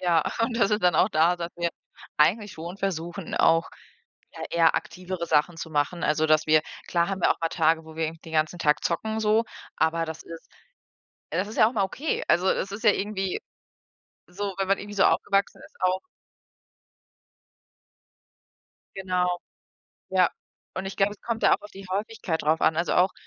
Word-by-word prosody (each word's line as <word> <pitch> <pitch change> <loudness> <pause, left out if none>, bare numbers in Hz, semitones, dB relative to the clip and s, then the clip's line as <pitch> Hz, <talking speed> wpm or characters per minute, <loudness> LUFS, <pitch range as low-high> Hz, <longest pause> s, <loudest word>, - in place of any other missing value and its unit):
ja, 170 -3 +3 0.2
und 230 +1 0
dann 230 - +3
sind 210 0 0
dann 180 -2 +4
auch 170 - +4
da, 170 0 +3
dass 170 -1 -4
wir 170 0 -1 0.5
eigentlich 195 +7 +3
schon 170 +3 -7
versuchen, 175 -2 -4
auch, 165 0 +3 0.6
ja, - - -8
eher 165 -1 +4
aktivere 180 -1 -4
Sachen 160 +2 +2
zu 165 0 -7
machen. 150 +3 -1
Also, 155 +1 +2
dass 155 0 +3
wir 155 0 +5 0.3
klar 170 -1 +1
haben 195 -1 -3
wir - - +4
auch - - -16
mal 165 - +1
Tage, 160 -1 +2
wo 160 0 -12
wir 160 - 0
irgendwie 160 +1 -5
den 165 - -11
ganzen 155 +3 +1
Tag 150 -3 +2
zocken 220 +6 -1
so, 220 +1 +3 0.3
aber 165 +1 +1
das 160 0 -7
ist 165 -1 -11 0.8
das 185 - -1
ist 215 - -8
ja 215 - +7
auch - - -7
mal 205 - +2
okay. 275 +11 -2
Also, 180 +2 +3
es 195 +1 0
ist 215 +4 -7
ja 210 - +7
irgendwie 195 -2 -2 0.9
so, 195 +2 -4
wenn 195 -1 -1
man 195 +1 +3
irgendwie 205 0 -8
so 195 - +4
aufgewachsen 200 0 +1
ist, - - -16
auch 185 0 +2 3.0
Genau. 180 -2 0 0.7
Ja. 185 -2 +4 0.4
Und 190 +1 -4
ich 195 - -6
glaube, 195 +1 +2
es 205 - -14
kommt 230 -1 -3
da - - +5
auch - - -4
auf 205 - -12
die 195 0 -11
Häufigkeit 200 -4 -2
drauf 155 +2 +2
an. 160 - +3
Also, 170 +2 0
auch, 185 +1 +4
180 Hz, 190 wpm, -26 LUFS, 165-195 Hz, 3.0 s, ja